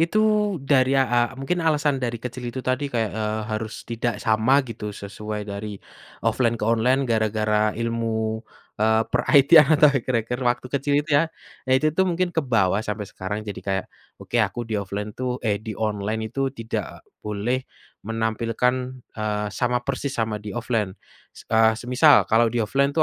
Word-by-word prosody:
itu 170 +6 +2 0.4
dari 135 -1 +3
ya 135 - +4
a 120 -1 +1 0.2
mungkin 135 +7 -2
alasan 150 -3 +1
dari 120 -2 -2
kecil 125 +2 -7
itu 130 +2 -6
tadi 130 +3 0
kayak, 115 -5 -1
eee, 110 0 -2
harus 110 0 -4
tidak 115 0 -2
sama 115 +6 +3
gitu 115 -3 -6
sesuai 105 +1 -6
dari, 100 0 -6 0.5
offline 115 +1 +2
ke 105 - -3
online 120 +4 +2
gara-gara 110 -2 +1
ilmu, 115 -1 -1 0.4
eee, 110 +1 +4
per 125 - +3 0.2
IT 140 0 +5
atau 150 0 +5
hacker-hacker 125 -2 -1
waktu 125 0 0
kecil 140 +1 0
itu - - -10
ya, 165 - 0 0.4
ya - - +3
itu 155 +3 +1
tuh 190 +4 +2
mungkin 175 0 0
kebawa 115 - +2
sampai 105 -1 -4
sekarang 100 +2 -5
jadi 105 -1 -6
kayak 95 -1 -1 0.3
oke - - -5
aku 115 +3 -1
di-offline 105 -1 -4
itu, 125 +2 -3
eh, 105 -2 +1
di 110 -1 -6
online 110 +1 -2
itu 135 +1 0
tidak 115 -4 -6 0.2
boleh 105 +5 -1 0.5
menampilkan, 115 +3 -1 0.2
eee, 105 -1 -1
sama 125 +1 0
persis 140 0 -3
sama 110 -2 -1
di-offline, 105 -2 -2 0.6
eee, 110 0 +5
semisal 125 +5 +5
kalau 115 +1 +4
di-offline 120 +4 +1
itu - - +3
115 Hz, 160 wpm, -23 LUFS, 110-130 Hz, 0.6 s, IT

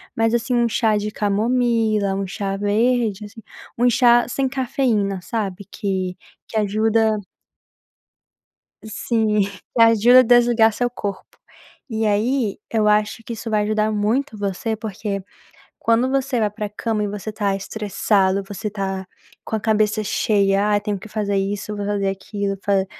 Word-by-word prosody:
mas 225 0 +1
assim 240 +2 0
um 235 -1 +2
chá 225 -1 +2
de 210 0 -2
camomila, 215 -1 +1
um 195 0 -2
chá 195 +1 -3
verde 215 +1 +1
assim, 210 +2 -12 0.4
um 245 +1 +4
chá 240 0 +5
sem 270 +2 0
cafeína 250 -7 0
sabe 200 -1 -4
que 190 -3 -3 0.3
que - - -11
ajuda 215 +1 +2 1.7
Sim, 220 -1 0 0.3
que 230 - +4
ajuda 230 +2 +7
a - - +7
desligar 240 -2 +4
seu 245 +2 0
corpo. 205 -5 -6 0.5
E 220 -1 -1
aí 215 +2 +1
eu 215 -2 +2
acho 210 +2 +1
que 235 - -5
isso 225 +1 -6
vai 210 -1 +1
ajudar 215 +1 0
muito 215 +3 -1
você 205 +3 -2
porque, 205 -2 -4 0.6
quando 230 +3 +2
você 270 -2 0
vai 210 -1 +1
pra 210 0 -5
cama 215 +1 -2
e - - -2
você 205 +1 -5
está 205 -2 -1
estressado, 200 -1 0
você 210 +2 -5
está 190 -2 -4 0.4
com 220 - -2
a - - -3
cabeça 215 0 +1
cheia, 200 -1 +2
"ai, 205 0 +2
tenho 205 -1 -3
que 205 - -11
fazer 205 -2 -2
isso, 205 +2 -2
vou 205 - -3
fazer 200 -1 0
aquilo, 195 0 -3
fa 195 -2 +2
215 Hz, 155 wpm, -21 LUFS, 200-230 Hz, 1.7 s, ajuda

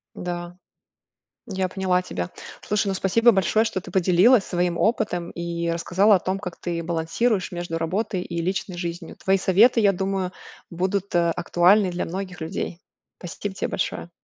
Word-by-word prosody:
Да. 175 0 -5 0.9
Я 190 -2 -1
поняла 185 -1 0
тебя. 90 - -5 0.3
Слушай, 210 0 -1
ну, 195 - 0
спасибо 230 +6 +4
большое, 200 +3 +2
что 215 -4 -2
ты - - -11
поделилась 190 +5 +4
своим 175 -1 -1
опытом 180 -6 0
и 170 0 -3
рассказала 185 +5 +3
о 185 - +3
том, 190 +1 -2
как 180 -4 -7
ты 170 -1 -3
балансируешь 175 +5 0
между 175 -2 -4
работой 185 +3 -2
и 170 -1 -4
личной 185 +1 -2
жизнью. 170 -1 -5
Твои 195 0 +1
советы, 210 +6 +4
я 200 -2 +4
думаю, 190 0 -2 0.4
будут, 190 +3 -2
э, 170 -1 +3
актуальны 180 +4 +3
для 175 - -2
многих 185 0 -6
людей. 165 +1 -4 0.4
Спасибо 190 +3 -6
тебе - - -2
большое. 175 -2 -3
185 Hz, 160 wpm, -24 LUFS, 175-195 Hz, 0.9 s, спасибо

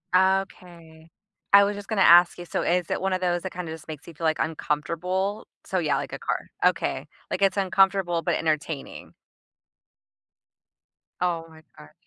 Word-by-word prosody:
Okay. 175 -4 -1 0.4
I 200 0 +8
was 205 0 0
just 205 -1 -9
gonna 215 -4 0
ask 175 0 +7
you, 175 - -8
so - - -2
is 175 0 0
it - - -1
one 190 0 0
of 185 - -1
those 175 -1 0
that 190 - -5
kinda 170 -2 -6
just 160 -1 -9
makes 155 -1 -9
you 170 - -10
feel, 165 +2 -5
like, 155 0 +2
uncomfortable? 170 +6 -2 0.2
So, 185 - -1
yeah, 150 -4 +1
like - - -5
a - - -5
car - - -3 0.2
okay, - - 0 0.2
like, 190 - -2
it's 195 0 +3
uncomfortable 190 -2 +2
but - - 0
entertaining. 155 -2 -3 2.1
Oh 170 -2 -1
my 160 0 -16 0.2
gosh. 75 0 -15
175 Hz, 175 wpm, -25 LUFS, 160-190 Hz, 2.1 s, I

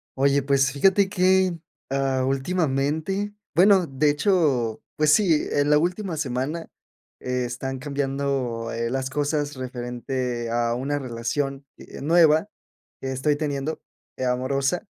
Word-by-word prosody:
Oye, 140 +1 +3
pues 140 0 +2
fíjate 190 +7 +3
que, 185 -2 +2 0.3
ah, 135 -1 +1
últimamente 155 +6 -1 0.2
bueno, 190 0 +5
de 135 +2 +1
hecho, 145 - +1
pues 150 -1 +4
sí, 170 -7 +3
en 145 +1 +2
la 150 - +6
última 180 +2 -2
semana 145 +3 -3 0.5
están 125 +1 -3
cambiando, 135 -4 -2
eh, 115 0 -2
las 130 0 -2
cosas, 145 +1 -1
referente 125 -1 -4
a 120 0 +1
una 140 +4 -2
relación, 135 +3 -3
eh, - - -11
nueva 160 +2 +4 0.5
que 135 - -3
estoy 135 +3 +1
teniendo, 145 0 -3 0.4
eh, 130 - -2
amorosa. 135 - 0
140 Hz, 125 wpm, -24 LUFS, 130-160 Hz, 0.5 s, la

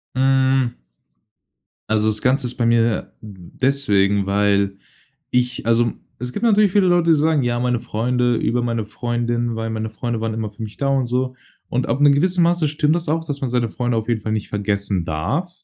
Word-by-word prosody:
Hm. 130 -1 +2 1.1
Also 110 0 +2
das 105 0 -1
Ganze 130 +1 +1
ist 125 - -6
bei 120 -2 +1
mir, 115 -1 +1
mm, 95 -5 -12
deswegen 100 -8 +2
weil 100 0 +1 0.5
ich 125 -2 0
Also, 115 0 +3 0.3
es 125 +1 -5
gibt - - -5
natürlich 210 -4 +4
viele 200 -3 +4
Leute, 175 -2 +3
die 160 - +6
sagen:„Ja, 145 -6 +1
meine 125 -1 0
Freunde 120 +2 0
über 120 +2 0
meine 115 -2 -1
Freundin, 120 0 -2
weil 115 0 -3
meine 110 0 -3
Freunde 115 +1 -3
waren 110 -1 -2
immer 110 -2 -3
für 105 +2 -10
mich 110 0 -7
da!" 140 - 0
Und 135 -2 +1
so. 125 +1 -1 0.3
Und 125 +1 -1
ab 125 +5 0
'nem 145 -1 +6
gewissen 180 +4 +2
Maße 170 -3 +2
stimmt 150 +1 +1
das 170 -2 -4
auch, 160 +2 0
dass 145 -3 -5
man 135 - -2
seine 120 -2 0
Freunde 120 -2 -1
auf 110 +1 -2
jeden 115 -2 0
Fall 110 - -2
nicht 110 -2 -2
vergessen 100 -3 -1
darf, 105 - -2
120 Hz, 200 wpm, -20 LUFS, 110-140 Hz, 1.1 s, die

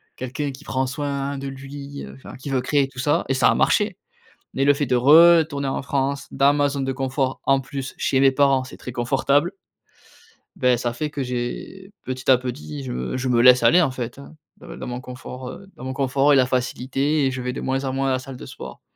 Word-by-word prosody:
quelqu'un 135 +3 -4
qui 135 +3 -12
prend 130 -2 -1
soin 140 +1 -3
de 140 - -5
lui, 140 +1 -8
heu, - - -11
enfin, 135 - -11
qui 135 +2 -7
veut 130 - +1
créer 140 0 +1
tout 130 -2 -12
ça 145 +3 +1
et - - +2
ça 130 - +3
a - - +2
marché. - - +2 0.6
Mais 135 - 0
le 145 - +6
fait 145 0 -1
de 125 - +1
retourner 150 +1 +5
en - - -2
France, 140 0 -2
dans 140 +1 +3
ma 145 0 +2
zone 140 -1 -3
de 135 - -1
confort, 135 0 -2
en 135 0 +3
plus, 135 -1 -6
chez 135 - +1
mes 135 - +6
parents 135 -1 +3
c'est 130 - -11
très 125 - -8
confortable. 140 +8 +1 1.0
Beh, 125 -1 +3
ça 120 0 -2
fait 150 +6 -3
que 140 -2 -4
j'ai 125 +10 -5
petit 130 +1 -4
à 130 - +7
petit, 75 - -6
je 65 - -5
me 65 - -3
je 130 - -2
me 120 -1 +3
laisse 125 -1 +7
aller, 175 +10 +6
en 155 - +2
fait, 125 0 -6
hein, 145 +3 -13 0.2
dans - - -11
dans - - -7
mon 125 0 -4
confort, 125 0 -9
heu, 195 - -10
dans 130 - -10
mon 130 - -3
confort 140 +1 +2
et - - +6
la 130 -1 +5
facilité 135 +3 0
et 135 - +1
je 130 - -4
vais 125 0 -3
de - - -5
moins 135 +1 -1
en 130 - -2
moins 135 0 0
à - - +1
la 130 - +1
salle 135 0 -9
de - - -10
sport. - - -10
135 Hz, 245 wpm, -22 LUFS, 125-140 Hz, 1.0 s, à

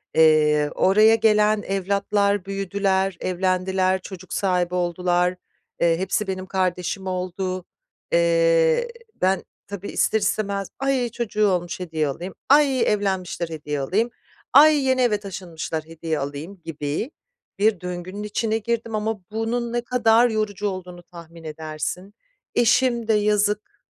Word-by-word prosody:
Eee, 150 -2 +4
oraya 215 +4 +5
gelen 215 -1 +3
evlatlar 200 0 0
büyüdüler, 195 -1 -1
evlendiler, 185 +1 0
çocuk 185 -1 -9
sahibi 180 -2 0
oldular, 180 0 +1 0.5
eee, 165 -1 +3
hepsi 190 +3 -1
benim 185 -1 -3
kardeşim 185 0 -2
oldu, 185 0 -3 0.5
eee, - - +3 0.3
ben 190 +1 +2 0.2
tabii 200 0 -6
ister 220 - +1
istemez 200 -1 -1
"Ay, 270 -3 0
çocuğu 215 -2 0
olmuş, 180 -2 -1
hediye 160 -4 -2
alayım. 175 +7 -5 0.2
Ay, 280 -2 +5
evlenmişler, 190 -4 -1
hediye 150 -2 -4
alayım. 205 - 0 0.4
Ay, 300 +3 +8
yeni 260 -1 +2
eve 215 -4 +2
taşınmışlar, 170 -5 -5
hediye 160 -1 -4
alayım." 145 +7 -6
gibi. 150 - -3 0.5
Bir 205 -3 +2
döngünün 180 +3 -6
içine 215 +1 -1
girdim 230 0 -2
ama 215 -1 -2
bunun 230 +2 -2
ne 240 - 0
kadar 235 -1 +3
yorucu 210 -2 -1
olduğunu 180 -2 -6
tahmin 170 -1 -13
edersin, 155 +5 -5 0.4
eşim 240 0 +3
de 225 - +3
yazık 210 0 +1
195 Hz, 125 wpm, -23 LUFS, 180-220 Hz, 0.5 s, Ay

